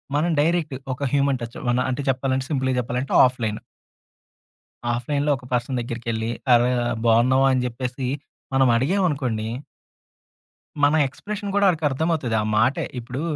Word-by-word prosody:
మనం 160 +4 +1
డైరెక్ట్ 160 -2 0 0.2
ఒక 130 - -6
human 140 -2 +2
touch 120 0 -7
one 120 +1 +2
అంటే 130 +2 -2
చెప్పాలంటే, 130 0 0
సింపుల్‌గా 130 -3 0
చెప్పాలంటే 125 +3 -3
ఆఫ్‌లైను. 115 -4 -2 1.4
ఆఫ్‌లైన్‌లో 145 +4 -1
ఒక 125 - -14
పర్సన్ 125 +1 0
దగ్గరికెళ్లి, 115 -1 -3 0.2
అరె! 120 +1 +4 0.3
బాగున్నావా 125 +4 +4
అని 130 -1 +1
చెప్పేసి 125 +1 -4 0.5
మనం 135 0 +4
అడిగాం 180 +11 +1
అనుకోండి. 125 -7 -2 1.4
మన 145 +2 +5
ఎక్స్‌ప్రెషన్ 205 +8 -6
కూడా 205 0 +4
వాడికి 165 -4 +1
అర్థమవుతది. 145 -4 -1
ఆ - - -2
మాటే. 125 +5 +2
ఇప్పుడు, 125 +3 -6
130 Hz, 135 wpm, -23 LUFS, 120-145 Hz, 1.4 s, మన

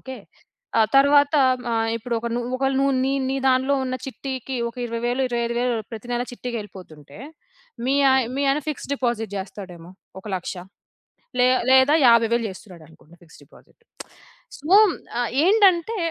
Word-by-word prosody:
Okay. 260 -2 -9 0.6
ఆ - - +5 0.2
తర్వాత 285 +2 +4 0.4
ఆహ్, 225 0 0
ఇప్పుడు 235 +1 -4
ఒక, 235 - -5
నువ్వు 245 +1 -3
ఒకవేళ 270 0 0
నువ్వు 275 0 +2
నీ 270 - 0 0.2
నీ 270 - -1
దాన్లో 260 +2 +2
ఉన్న 255 - -3
చిట్టీకి 265 -1 -6
ఒక 235 - -13
20000, 240 +3 -2
25000 240 0 -1 0.2
ప్రతి 225 +1 -9
నెల 240 0 -1
చిట్టీకెళ్ళిపోతుంటే, 195 - -9 0.7
మీ 270 - +1 0.2
ఆయ 265 0 +3
మీ 280 - -1
ఆయన 285 +2 +1
ఫిక్స్‌డ్ 285 -1 -5
డిపాజిట్ 235 -6 -3
జేస్తాడేమో. 185 -3 -9 0.3
ఒక 215 - -17
100000 180 - -6 0.9
లే 250 - +5 0.2
లేదా 265 +3 +5
50000 230 0 +3
జేస్తున్నాడనుకోండి 170 -4 -15
ఫిక్స్‌డ్ 165 -1 -18
డిపాజిట్. - - -23 0.8
సో, 295 - -11 0.5
ఆహ్, 240 - -1 0.2
ఏంటంటే, 400 0 +3
245 Hz, 140 wpm, -22 LUFS, 220-270 Hz, 0.9 s, ఆ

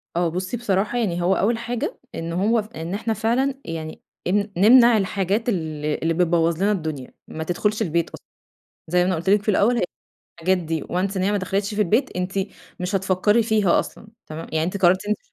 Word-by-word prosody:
آه 175 0 +2
بُصّي، 185 +7 -3
بصراحة 210 0 0
يعني 180 -7 0
هو 185 +2 +3
أول 225 +4 +1
حاجة 235 0 -4 0.2
إنه 170 +3 -2
هو 225 +2 +3 0.2
إن 165 +3 -5
إحنا 225 +2 -1
فعلًا 240 +6 0
يعني 160 -1 -6 0.3
إن 205 +3 +1
نمنع 235 +3 +7
الحاجات 200 +3 0
ال 155 -6 -3 0.2
اللي 165 +1 +1
بتبوظ 170 -1 +2
لنا 200 +4 +2
الدنيا، 155 -9 -4
ما 160 - -5
تدخلش 210 +6 -1
البيت 170 -4 0
أصلًا، - - -12 0.6
زي 180 +2 +2
ما - - +3
أنا 185 - +1
قُلت 170 +4 -2
لِك 205 +1 +4
في 215 - -1
الأول، 225 +5 +3
هي - - +1 0.6
حاجات 185 +3 +2
دي 160 -3 -3
Once 190 +3 -2
إن 185 - 0
هي 200 - +1
ما 205 - +2
دخلتش 200 +2 -2
في 215 - -1
البيت، 210 +6 0
أنتِ 180 +1 -2 0.5
مش 180 +2 -2
هتفكري 195 +4 +2
فيها 215 -5 +3
أصلًا 220 - -10 0.2
تمام، 155 +1 -7
يعني 160 0 +1
أنتِ 180 +4 -2
قررتِ 185 +1 +3
أنتِ 210 0 0
190 Hz, 205 wpm, -23 LUFS, 170-215 Hz, 0.6 s, نمنع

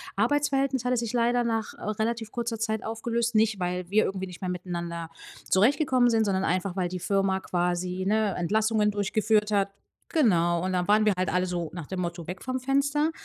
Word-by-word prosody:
Arbeitsverhältnis 270 +2 +1
hatte 250 0 +1
sich 235 0 -2
leider 240 0 +2
nach, 225 -2 -2
äh, - - -13
relativ 225 +1 -2
kurzer 235 -2 -3
Zeit 220 -1 -1
aufgelöst. 230 +1 -2
Nicht, 215 -2 +3
weil 180 0 -2
wir 215 +2 +4
irgendwie 190 0 -3
nicht 180 0 -11
mehr 185 - -2
miteinander 170 -2 -4 0.4
zurechtgekommen 255 - +3
sind, 225 -1 +2
sondern 190 -1 0
einfach, 185 +2 -1
weil 180 -2 0
die 180 0 -4
Firma 195 0 +1
quasi, 180 +1 -1
ne, 210 -1 +1
Entlassungen 215 +3 +1
durchgeführt 210 +1 +1
hat. 200 -1 +2 0.4
Genau, 175 - +2
und 185 0 -1
dann 180 0 0
waren 215 +1 +5
wir 210 - +4
halt 185 - 0
alle 180 0 +2
so 175 -3 -3
nach 170 -5 -7
dem 185 -1 -3
Motto: 170 -1 -4
„Weg 180 +1 -6
vom 255 0 -2
Fenster.“ 280 +4 +1
210 Hz, 195 wpm, -27 LUFS, 180-235 Hz, 0.4 s, waren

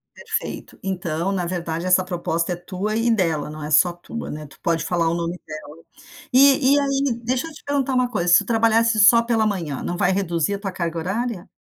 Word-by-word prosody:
Perfeito, - - -5
então, 175 -2 -2
na 185 -3 -1
verdade, 170 -1 -3
essa 185 0 +4
proposta 175 -1 -2
é - - -3
tua 190 +4 -4
e 230 +1 +2
dela. 165 -9 0
Não 155 0 -8
é 150 - -5
só 165 +3 +4
tua, 205 +7 -7
né? 150 0 -7
Tu 135 - -18
pode 165 -2 0
falar 170 -1 0
o - - 0
nome 170 +1 -3
dela. 155 -1 -9 0.6
E 275 +1 +6
e - - +4
aí, 275 -3 0
deixa 255 +5 -1
eu 325 - -9
te 300 - -14
perguntar 275 -2 0
uma 255 -1 +1
coisa: 180 -7 -1
se - - +9
tu 205 - -1
trabalhasse 230 0 +2
só 230 +3 +7
pela 230 -2 +1
manhã, 170 -10 -3
não 175 - -3
vai 180 +1 +2
reduzir 180 -1 0
a - - -3
tua 195 -1 -5
carga 170 -2 -3
horária? 195 +3 -3
185 Hz, 220 wpm, -22 LUFS, 170-230 Hz, 0.6 s, se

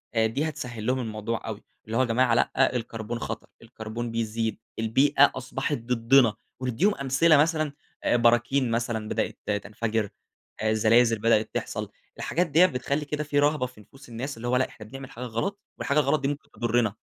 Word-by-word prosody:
دي 115 +8 +1
هتسهل 120 -7 -6
لهم 130 +2 +1
الموضوع 110 0 -4
أوي. 110 -2 -6 0.2
اللي 110 +1 -2
هو - - +4
يا - - +3
جماعة 120 +1 +3
لأ 130 +2 +2
الكربون 115 -1 -4
خطر، 110 0 -5
الكربون 115 0 -6
بيزيد، 115 0 -2 0.2
البيئة 135 +5 +4
أصبحت 135 +3 -2
ضدنا. 115 0 +3 0.3
وندّيهم 130 - +1
أمثلة 140 +4 +4
مثلًا 155 0 +2 0.3
براكين 120 +2 +3
مثلًا 115 -2 -1
بدأت - - -1 0.3
تنفجر، 110 0 -2 0.5
زلازل 110 +1 +4
بدأت 110 0 +3
تحصَل. - - -3 0.3
الحاجات 175 +2 0
ديّة 165 +4 +6
بتخلّي 140 0 -1
كده 150 +1 -2
في 145 -1 0
رهبة 145 -2 +2
في 125 -4 -11
نفوس 135 +5 -17
الناس، 120 +3 -5
اللي 120 - -5
هو 125 - +2
لأ 130 - +2
إحنا 110 - -12
بنعمل 135 +4 -9
حاجة 120 - -7
غلط، 125 - -3 0.2
والحاجة 145 +1 +1
الغلط 145 +1 +2
دي 135 - 0
ممكن 145 +1 -5
تضرِّنا، 120 -3 0
120 Hz, 170 wpm, -26 LUFS, 115-140 Hz, 0.5 s, ديّة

